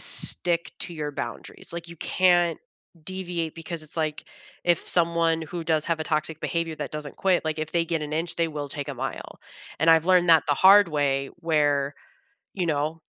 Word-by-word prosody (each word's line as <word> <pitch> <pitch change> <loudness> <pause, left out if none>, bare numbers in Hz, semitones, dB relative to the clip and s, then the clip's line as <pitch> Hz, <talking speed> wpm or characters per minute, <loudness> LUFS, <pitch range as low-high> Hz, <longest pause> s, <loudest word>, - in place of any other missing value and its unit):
stick 170 -1 0
to - - -5
your 150 -3 -4
boundaries, 120 +1 -6
like, 170 0 -6
you 170 - -10
can't 175 -1 +2 0.4
deviate 175 -2 -4
because 165 0 -6
it's, 155 +2 -4
like, 155 -2 -2 0.4
if 175 -2 +1
someone 165 -1 +3
who 165 +2 -6
does 155 -2 +1
have 165 -1 0
a - - -2
toxic 155 0 -1
behavior 165 -1 -2
that 150 - -5
doesn't 150 -2 -6
quit, 185 -2 +2
like, 155 0 -2
if 155 0 -4
they 170 -1 +2
get 165 -2 -1
an 150 0 -5
inch, 165 +2 -2
they 170 - +2
will 150 -2 -5
take 145 +1 -5
a 140 - -4
mile, 130 0 -6 0.4
and 160 - +2
I've 165 -1 +5
learned 180 -1 +4
that 160 -2 +7
the 145 - +2
hard 195 +4 +7
way 140 -3 0
where, 145 -4 +1 0.6
you 180 -3 -2
know? 155 +1 -1
160 Hz, 195 wpm, -25 LUFS, 150-170 Hz, 0.6 s, that